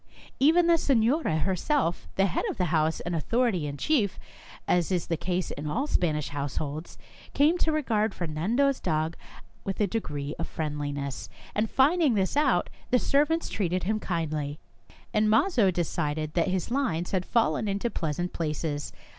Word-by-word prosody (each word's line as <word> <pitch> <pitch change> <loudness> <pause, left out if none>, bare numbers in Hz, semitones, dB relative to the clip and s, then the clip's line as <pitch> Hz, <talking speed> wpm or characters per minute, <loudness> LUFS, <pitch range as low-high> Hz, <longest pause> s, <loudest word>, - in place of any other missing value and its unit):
Even 325 +5 +5
the 335 -1 +4
senora 245 - +2
herself, 190 - 0
the 195 - +3
head 180 - -1
of - - -4
the 180 - +1
house 160 0 +1
and 175 0 -3
authority 195 - +1
in 140 0 -5
chief, 215 - +1 0.5
as 175 +1 +2
is 180 -3 0
the 165 - -1
case 180 +2 -2
in 150 +1 -5
all 255 - 0
Spanish 155 - 0
households, 145 +2 -4 0.4
came 300 +4 +4
to 320 - +2
regard 225 -8 0
Fernan 170 +6 -2
do's 275 0 +3
dog 160 -1 -1 0.5
with 195 - -4
a 210 - +4
degree 150 -9 -3
of 165 - -2
friendliness, 145 -3 -4 0.2
and 215 +1 0
finding 290 -1 +3
this 190 +2 0
out, 275 -11 +3 0.2
the 250 - +4
servants 300 +6 +2
treated 185 -2 -1
him 215 +4 0
kindly; 155 -6 -2 0.6
and 215 0 +3
Mazo 225 - +4
decided 155 -3 -2
that 170 - +2
his 185 +2 -1
lines 185 -11 0
had 185 -2 0
fallen 225 0 +1
in 200 0 0
pleasant 175 -6 -2
places. 150 -2 -3
185 Hz, 165 wpm, -27 LUFS, 155-240 Hz, 0.6 s, Even